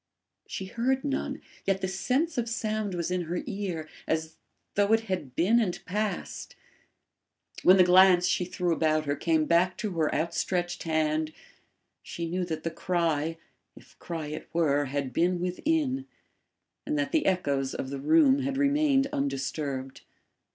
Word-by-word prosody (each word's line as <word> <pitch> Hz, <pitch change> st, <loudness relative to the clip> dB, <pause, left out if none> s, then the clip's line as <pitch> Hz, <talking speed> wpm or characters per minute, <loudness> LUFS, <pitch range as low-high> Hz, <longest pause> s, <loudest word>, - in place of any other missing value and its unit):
She 190 Hz, -, -5 dB
heard 255 Hz, +7 st, 0 dB
none, 280 Hz, -2 st, -3 dB, 0.2 s
yet 195 Hz, 0 st, +1 dB
the 190 Hz, -, 0 dB
sense 255 Hz, -, 0 dB
of 235 Hz, -1 st, -2 dB
sound 215 Hz, -4 st, -2 dB
was 170 Hz, 0 st, -2 dB
in 180 Hz, -1 st, -1 dB
her 175 Hz, +2 st, -3 dB
ear, 195 Hz, -8 st, -4 dB, 0.2 s
as 160 Hz, 0 st, -2 dB, 0.4 s
though 205 Hz, +1 st, +2 dB
it 225 Hz, -, +4 dB
had 185 Hz, -, -4 dB
been 210 Hz, +10 st, +4 dB
and 195 Hz, -7 st, -1 dB
passed. 210 Hz, +2 st, -3 dB, 1.1 s
When 185 Hz, +1 st, +7 dB
the 185 Hz, -, +7 dB
glance 180 Hz, 0 st, +6 dB
she 180 Hz, 0 st, +1 dB
threw 180 Hz, -1 st, -1 dB
about 155 Hz, -1 st, +1 dB
her 145 Hz, 0 st, 0 dB
came 160 Hz, 0 st, +1 dB
back 175 Hz, +3 st, +2 dB
to 215 Hz, -3 st, -3 dB
her 155 Hz, -, +2 dB
outstretched 175 Hz, +1 st, -1 dB
hand, 155 Hz, -1 st, 0 dB, 0.7 s
she 170 Hz, -, -5 dB
knew 180 Hz, +2 st, -1 dB
that 160 Hz, -2 st, -4 dB
the 165 Hz, -, -2 dB
cry, 165 Hz, -2 st, -1 dB, 0.4 s
if -, -, -17 dB
cry 165 Hz, -3 st, -5 dB
it 150 Hz, +1 st, -7 dB
were, 145 Hz, -4 st, +2 dB
had 135 Hz, -1 st, -3 dB
been 175 Hz, +4 st, +2 dB
within, 265 Hz, -, -1 dB, 0.8 s
and 300 Hz, -, -2 dB
that 285 Hz, -3 st, -1 dB
the 320 Hz, -, +2 dB
echoes 140 Hz, -8 st, 0 dB
of 130 Hz, -, -4 dB
the 140 Hz, -, -4 dB
room 285 Hz, -, +5 dB
had 275 Hz, 0 st, -2 dB
remained 280 Hz, -1 st, +3 dB
undisturbed. 135 Hz, -1 st, -3 dB
180 Hz, 160 wpm, -28 LUFS, 155-215 Hz, 1.1 s, When